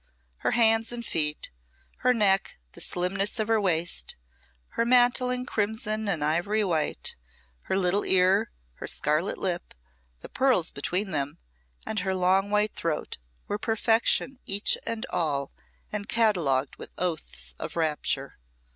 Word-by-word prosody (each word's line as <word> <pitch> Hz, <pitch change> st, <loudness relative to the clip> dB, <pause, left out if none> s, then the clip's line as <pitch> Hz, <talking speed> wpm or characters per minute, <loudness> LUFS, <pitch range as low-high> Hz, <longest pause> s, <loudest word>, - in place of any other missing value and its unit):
Her -, -, -1 dB
hands 225 Hz, -1 st, +4 dB
and 240 Hz, -1 st, -5 dB
feet, 150 Hz, -4 st, -1 dB, 0.5 s
her 250 Hz, -, +3 dB
neck, 200 Hz, -5 st, +2 dB
the -, -, -9 dB
slimness 195 Hz, +5 st, -1 dB
of 215 Hz, -, 0 dB
her 225 Hz, -1 st, +3 dB
waist, 170 Hz, -3 st, 0 dB, 0.5 s
her 230 Hz, -, 0 dB
mantling 250 Hz, +1 st, +3 dB
crimson 215 Hz, -2 st, -1 dB
and 165 Hz, -6 st, -1 dB
ivory 175 Hz, +8 st, +1 dB
white, 165 Hz, -6 st, -1 dB, 0.5 s
her 190 Hz, -, +2 dB
little 190 Hz, +2 st, +2 dB
ear, 190 Hz, +4 st, +3 dB, 0.3 s
her -, -, -6 dB
scarlet 155 Hz, +6 st, 0 dB
lip, 180 Hz, -2 st, -3 dB, 0.5 s
the -, -, -8 dB
pearls 255 Hz, -11 st, +2 dB
between 185 Hz, +7 st, -2 dB
them 145 Hz, -2 st, -1 dB, 0.5 s
and 215 Hz, -, -2 dB
her 190 Hz, +1 st, -1 dB
long 190 Hz, +2 st, +2 dB
white 210 Hz, 0 st, +2 dB
throat, 160 Hz, -, -3 dB, 0.3 s
were 205 Hz, -, -2 dB
perfection 230 Hz, +4 st, +2 dB
each 200 Hz, +2 st, +3 dB
and 230 Hz, -1 st, -2 dB
all, 140 Hz, -5 st, 0 dB, 0.4 s
and 205 Hz, -1 st, -4 dB
catalogued 170 Hz, -, +2 dB
with -, -, -10 dB
oaths 150 Hz, -, -3 dB
of -, -, -5 dB
rapture. 150 Hz, -, -1 dB
195 Hz, 140 wpm, -27 LUFS, 165-220 Hz, 0.5 s, hands